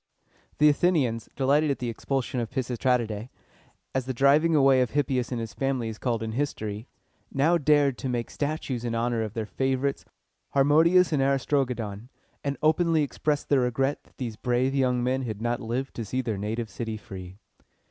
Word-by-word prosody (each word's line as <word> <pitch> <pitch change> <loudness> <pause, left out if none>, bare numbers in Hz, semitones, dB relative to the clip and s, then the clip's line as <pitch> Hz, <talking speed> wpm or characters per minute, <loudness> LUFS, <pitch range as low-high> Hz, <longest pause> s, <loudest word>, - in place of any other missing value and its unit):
The 150 - +6
Athenians, 145 -8 +2
delighted 145 +3 +2
at 140 - 0
the 125 - -4
expulsion 130 +2 -2
of 115 -2 -2
the - - -23
Pis 130 -2 -1
is 120 - -3
trat´i 125 -2 +2
dæ, 105 +3 -6 0.6
as 130 -2 -1
the 130 - -2
driving 150 +6 +4
away 135 -3 +5
of 125 - +1
Hippias 135 -4 0
and 120 - -2
his 115 -2 -5
family 135 -4 -1
is 110 - -8
called 115 -3 -1
in 110 - -3
history, 110 -4 -3 0.4
now 160 +5 +3
dared 145 -3 +3
to 130 - -3
make 120 -2 -2
statues 145 -5 -3
in 115 -1 -2
honor 115 0 0
of 110 -1 -4
their 110 -1 -2
favorites 130 +6 -1 0.5
Harmodius 160 +6 +5
and 140 - +2
Aristogiton, 125 -5 0 0.3
and 140 0 -2
openly 160 0 +3
expressed 145 +1 -2
their 140 -3 +4
regret 135 +3 0
that - - -27
these 115 -4 -5
brave 125 +3 +1
young 125 -3 +1
men 130 +2 0
had 110 -5 -4
not 120 +1 -1
lived 125 +4 -3
to 115 - -2
see 130 +5 -2
their 115 -3 -2
native 110 +1 -3
city 110 +1 -4
free. 95 -3 -10
130 Hz, 190 wpm, -26 LUFS, 115-140 Hz, 0.6 s, The